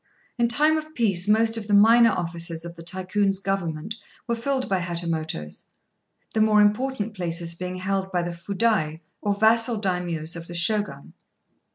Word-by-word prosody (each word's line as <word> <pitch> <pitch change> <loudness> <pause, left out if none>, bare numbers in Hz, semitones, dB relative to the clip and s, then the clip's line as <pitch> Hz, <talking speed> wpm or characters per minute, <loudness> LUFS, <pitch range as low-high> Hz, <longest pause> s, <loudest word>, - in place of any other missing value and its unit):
In 235 - +4
time 300 +7 +3
of 310 0 -11
peace 195 -6 +1
most 225 +2 +3
of 215 -2 -5
the 205 - +3
minor 230 +3 +7
offices 170 -3 -3
of 170 0 -8
the 165 - -11
Tycoon's 190 +3 -1
government 195 0 -3 0.3
were 235 - -1
filled 260 +3 -1
by 190 -1 +1
Hatamotos, 165 - -4 0.7
the 220 - +2
more 215 -1 +5
important 210 +1 +1
places 170 -3 -3
being 180 +2 -5
held 190 +1 -2
by 175 -1 0
the 175 - -3
Fudai, 180 -3 0 0.2
or 205 -1 0
vassal 225 +2 +3
Daimios 175 -4 -2
of 170 0 -8
the 175 - -7
Shogun. 175 -5 -1
195 Hz, 165 wpm, -24 LUFS, 170-220 Hz, 0.7 s, minor